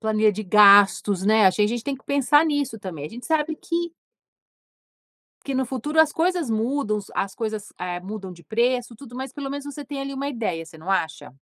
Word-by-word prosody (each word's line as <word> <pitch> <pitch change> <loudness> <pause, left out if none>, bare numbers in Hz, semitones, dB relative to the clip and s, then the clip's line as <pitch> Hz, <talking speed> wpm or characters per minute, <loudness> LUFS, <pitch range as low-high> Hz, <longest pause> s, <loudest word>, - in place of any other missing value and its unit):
Planilha 215 -1 +2
de 215 +2 -5
gastos, 200 -1 +6
né, 215 -1 +5
acho 185 - +3
que - - +3
a - - +4
gente 235 +1 -2
tem 275 -1 -2
que - - -22
pensar 285 +2 +3
nisso 285 -7 -1
também, 160 -7 -7
gente 240 +6 -9
sabe 315 -1 0
que 340 0 -3 1.5
que 275 - -3
no 260 0 +1
futuro 270 +5 0
as 315 -2 +4
coisas 340 -5 0
mudam, 225 0 0
os 200 - -9
as 195 - -2
coisas, 215 -2 -5
eh, 180 0 -4
mudam 190 0 -7
de 170 -1 -15
preço, 240 - 0
tudo, 245 0 -13
mas 265 0 -5
pelo 280 -2 -6
menos 285 0 -5
você 285 0 -7
tem 275 0 -6
ali 275 0 -4
uma 275 +1 -3
ideia, 210 -11 -3
você 160 0 -14
não 160 +5 -6
acha? 160 -9 -2
230 Hz, 215 wpm, -23 LUFS, 200-280 Hz, 1.5 s, gastos